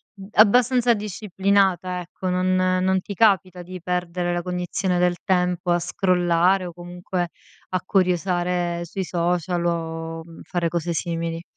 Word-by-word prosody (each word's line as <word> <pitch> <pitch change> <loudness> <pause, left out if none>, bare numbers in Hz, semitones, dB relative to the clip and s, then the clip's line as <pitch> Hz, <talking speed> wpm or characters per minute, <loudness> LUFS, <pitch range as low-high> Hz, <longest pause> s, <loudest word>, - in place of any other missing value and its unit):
mhmm, 195 -1 -11
abbastanza 245 +2 +5
disciplinata, 195 -3 0
ecco, 180 +1 -5
non 185 0 +1
non 185 +1 +2
ti 200 - -7
capita 185 -4 +2
di 185 0 -9
perdere 180 0 -2
la 175 -1 -2
cognizione 180 0 -1
del 180 0 +2
tempo 180 -1 +1
a 175 - +3
scrollare 180 +1 +2
o - - -6
comunque 175 0 -4 0.4
a 185 -1 -1
curiosare 180 -2 0
sui 190 +3 -4
social 175 0 -1
o 165 -1 -3 0.2
fare 175 -2 -1
cose 170 0 -2
simili. 165 0 -3
180 Hz, 135 wpm, -23 LUFS, 175-185 Hz, 0.4 s, abbastanza